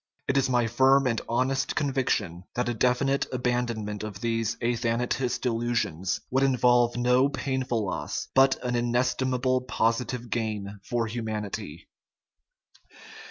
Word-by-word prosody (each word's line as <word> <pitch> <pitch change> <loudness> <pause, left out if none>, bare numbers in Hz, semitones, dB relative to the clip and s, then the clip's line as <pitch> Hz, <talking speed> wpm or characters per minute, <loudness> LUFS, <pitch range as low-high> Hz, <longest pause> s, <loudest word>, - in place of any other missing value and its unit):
It 135 - +1
is 135 -1 +2
my 120 -2 +2
firm 130 +4 +4
and 115 -3 0
honest 130 +3 0
conviction 130 - -1
that 125 0 0
a 120 - 0
definitive 125 +4 +1
abandonment 120 -4 -2
of 105 -3 -6
these 115 0 -1
"athanatist 120 +2 -1
illusions" 115 -7 -1
would 135 +1 +2
involve 125 -2 +3
no 125 +2 +3
painful 130 -5 -2
loss, 95 - -3
but 135 0 +5
an 125 -1 -1
inestimable 125 +1 +1
positive 120 0 -1
gain 105 -3 -3
for 120 +1 -1
humanity. 105 -6 -5
120 Hz, 120 wpm, -27 LUFS, 115-130 Hz, -, but